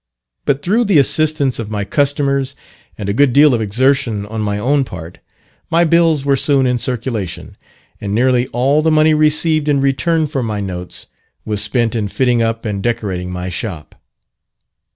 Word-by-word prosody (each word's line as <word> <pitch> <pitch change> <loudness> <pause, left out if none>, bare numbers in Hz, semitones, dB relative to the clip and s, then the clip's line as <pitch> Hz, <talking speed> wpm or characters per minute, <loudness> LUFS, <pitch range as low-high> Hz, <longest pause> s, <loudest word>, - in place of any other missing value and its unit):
But 140 0 0
through 225 +6 +1
the 200 -6 +3
assistance 145 -2 +2
of 110 -2 -5
my 105 -1 -2
customers, 140 +2 0 0.4
and 105 - -5
a 100 - 0
good 135 +2 +3
deal 145 0 +6
of 115 - 0
exertion 115 -1 0
on 110 +1 -5
my 105 -1 -1
own 140 +6 +1
part, 85 -8 -9 0.5
my 165 +1 +3
bills 165 -3 +2
were 140 -1 +3
soon 135 0 +2
in 125 -1 +1
circulation; 115 -7 -4 0.5
and 100 0 -3
nearly 125 +1 +2
all 135 +6 +1
the 160 - +2
money 155 0 +4
received 155 0 +1
in 140 -1 +2
return 155 +4 +1
for 145 -3 -3
my 110 -3 -3
notes 90 -3 -6 0.4
was 105 -1 -1
spent 115 0 0
in 105 -3 -1
fitting 120 +2 +1
up 115 0 -2
and 100 -2 -3
decorating 100 -6 -2
my 90 0 -5
shop. 90 -5 -6
125 Hz, 175 wpm, -16 LUFS, 105-145 Hz, 0.5 s, deal